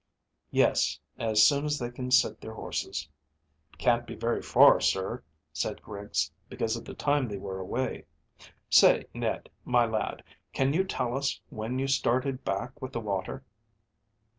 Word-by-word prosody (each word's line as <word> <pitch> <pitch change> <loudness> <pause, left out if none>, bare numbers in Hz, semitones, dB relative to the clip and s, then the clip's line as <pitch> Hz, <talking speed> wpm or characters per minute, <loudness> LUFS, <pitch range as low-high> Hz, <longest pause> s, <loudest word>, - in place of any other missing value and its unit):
"Yes; - - +2 0.2
as 110 -2 +4
soon 140 +5 +4
as 150 0 0
they 120 -2 -4
can 125 +1 -5
sit 125 - +3
their - - -8
horses." - - -4 0.7
"Can't 120 -1 +2
be 115 - -7
very 115 +2 -1
far, - - +6
sir," - - 0 0.3
said - - -3
Griggs, 100 0 -2 0.2
"because 115 0 -1
of 115 - -7
the - - -8
time 145 -3 +1
they 100 -2 -5
were 95 0 -6
away. 120 +7 -3 0.6
Say, - - +6
Ned, - - -2 0.2
my 120 -1 +3
lad, 110 -1 -2 0.3
can 135 +1 +1
you 190 +4 +2
tell 125 -9 -2
us 140 0 -1
when 110 +4 -4
you 135 +1 0
started 130 0 +1
back 120 +9 -3
with 130 0 -6
the 115 - -2
water?" 105 +4 -3
120 Hz, 160 wpm, -29 LUFS, 110-135 Hz, 0.7 s, far